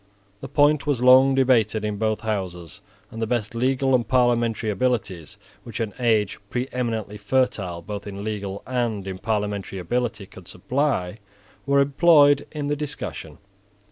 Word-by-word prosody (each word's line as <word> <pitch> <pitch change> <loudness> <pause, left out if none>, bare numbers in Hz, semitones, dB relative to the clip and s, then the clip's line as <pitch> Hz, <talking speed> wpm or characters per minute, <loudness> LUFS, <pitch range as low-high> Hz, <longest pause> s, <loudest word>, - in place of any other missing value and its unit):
The - - -8
point 145 0 +3
was 130 -4 0
long 130 +1 +6
debated 115 -5 +2
in 105 -1 -3
both 110 0 -1
houses; 90 -6 -4 0.3
and 115 - -7
the 115 - -1
best 115 -3 -2
legal 130 +3 +1
and 120 -3 +2
parliamentary 120 -3 +1
abilities 100 - -2 0.3
which 115 -1 -7
an 110 -3 -3
age 110 -4 +1
preeminently 115 -4 -3
fertile 100 -6 -1
both 100 +3 -7
in 100 0 -7
legal 100 -2 -5
and 120 -6 -2
in 95 -1 -6
parliamentary 105 -2 -2
ability 110 +3 -2
could 95 -2 -15
supply 110 -3 -2 0.5
were 140 0 +3
employed 145 0 +4
in 150 -2 -4
the 145 +1 0
discussion. 150 -1 -6
115 Hz, 145 wpm, -23 LUFS, 100-130 Hz, 0.5 s, long